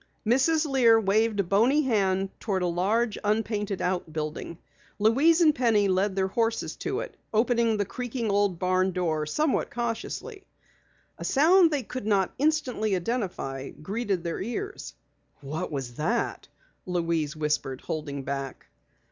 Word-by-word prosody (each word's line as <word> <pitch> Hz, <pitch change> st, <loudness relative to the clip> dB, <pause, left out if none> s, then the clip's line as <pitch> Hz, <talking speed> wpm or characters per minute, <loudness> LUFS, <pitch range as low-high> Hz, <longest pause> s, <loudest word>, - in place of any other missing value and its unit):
Mrs. 280 Hz, +8 st, +3 dB
Lear 245 Hz, -6 st, +5 dB
waved 215 Hz, +1 st, +1 dB
a -, -, -2 dB
bony 230 Hz, -, +3 dB
hand 195 Hz, -6 st, +1 dB
toward 190 Hz, -4 st, -1 dB
a -, -, +2 dB
large, 205 Hz, +6 st, 0 dB
unpainted 210 Hz, -2 st, -1 dB
outbuilding. 160 Hz, -3 st, -3 dB, 0.4 s
Louise 275 Hz, -, +4 dB
and 310 Hz, -3 st, +6 dB
Penny 225 Hz, -6 st, +2 dB
led 190 Hz, +1 st, +1 dB
their 190 Hz, -1 st, +1 dB
horses 225 Hz, +2 st, -1 dB
to -, -, -2 dB
it, -, -, -8 dB, 0.2 s
opening 230 Hz, 0 st, +2 dB
the 205 Hz, -, 0 dB
creaking 240 Hz, 0 st, -3 dB
old 200 Hz, -3 st, +2 dB
barn 185 Hz, +1 st, +1 dB
door 160 Hz, -4 st, -1 dB
somewhat 300 Hz, -, 0 dB
cautiously. 240 Hz, -, -4 dB, 0.8 s
A -, -, -6 dB
sound 335 Hz, +5 st, +5 dB
they 290 Hz, -4 st, -1 dB
could 245 Hz, -1 st, -6 dB
not 195 Hz, -3 st, +2 dB
instantly 265 Hz, -9 st, +1 dB
identify 175 Hz, -, -3 dB
greeted 195 Hz, +2 st, -3 dB
their 170 Hz, -1 st, -3 dB
ears. 395 Hz, -, -5 dB, 0.5 s
"What 150 Hz, +4 st, -4 dB
was 135 Hz, -4 st, -4 dB
that?" 225 Hz, +10 st, -1 dB, 0.4 s
Louise 165 Hz, -4 st, -1 dB
whispered, 150 Hz, -4 st, -2 dB
holding 145 Hz, -3 st, -4 dB
back. 135 Hz, -1 st, -5 dB
205 Hz, 140 wpm, -27 LUFS, 175-240 Hz, 0.8 s, and